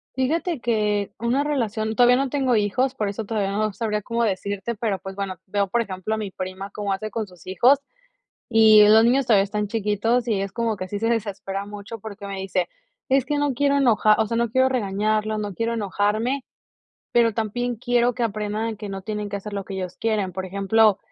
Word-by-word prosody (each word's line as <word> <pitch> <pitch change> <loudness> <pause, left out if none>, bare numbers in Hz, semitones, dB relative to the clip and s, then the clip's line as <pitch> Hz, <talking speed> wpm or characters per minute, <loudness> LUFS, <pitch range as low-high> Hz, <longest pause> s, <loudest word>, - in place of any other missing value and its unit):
Fíjate 315 +5 0
que 210 -4 0
una 240 +5 +1
relación 225 -6 -1
todavía 245 +1 +6
no 275 -1 0
tengo 265 -4 +1
hijos, 250 +6 +1
por 215 -5 -2
eso 210 +2 -5
todavía 200 -2 -1
no 215 0 -1
sabría 210 -2 -2
cómo 235 +2 -1
decirte, 200 +2 -2
pero, 205 -3 -2
pues, 190 +1 -8
bueno, 195 -2 -4
veo 200 +1 0
por 235 +5 +1
ejemplo 190 0 -4
a 220 - 0
mi 210 -2 -4
prima 185 +1 -6
cómo 205 -1 -3
hace 215 +3 -4
con 220 0 -3
sus 180 -3 -18
hijos. 245 +10 +4 0.7
Y 220 -2 +7
los 220 +1 +7
niños 255 +3 +3
todavía 210 -5 +5
están 210 +1 -2
chiquitos, 225 +3 0
y 210 -4 +1
es 195 0 -3
como 230 -1 -1
que 185 - -5
sí 205 +1 -4
se 225 - 0
desespera 200 -3 -2
mucho, 205 +2 -8
porque 200 -1 -8
me 195 -1 -5
dice: 185 -2 -1 0.4
"Es 265 -1 +3
que 290 +2 -1
no 290 -3 0
quiero 280 +1 +2
enoja 220 -5 +4
o 220 - +2
sea, 230 +1 -1
no 235 -1 +1
quiero 260 +2 +3
regañarlos, 215 -2 0
no 205 -3 -4
quiero 230 0 -1
enojarme, 215 +5 -1 0.7
pero 235 -1 +4
también 240 +3 -2
quiero 245 +1 +1
que 245 - -1
aprendan 215 +1 -2
a - - -9
que 210 0 -7
no 195 -1 -6
tienen 210 0 -4
que 205 - -4
hacer 205 +1 -6
lo 200 -1 -4
que 195 - -6
ellos 185 -2 -5
quieren. 210 -4 0
Por 190 +1 -4
ejemplo, 200 +2 +3
215 Hz, 215 wpm, -23 LUFS, 200-235 Hz, 0.7 s, Y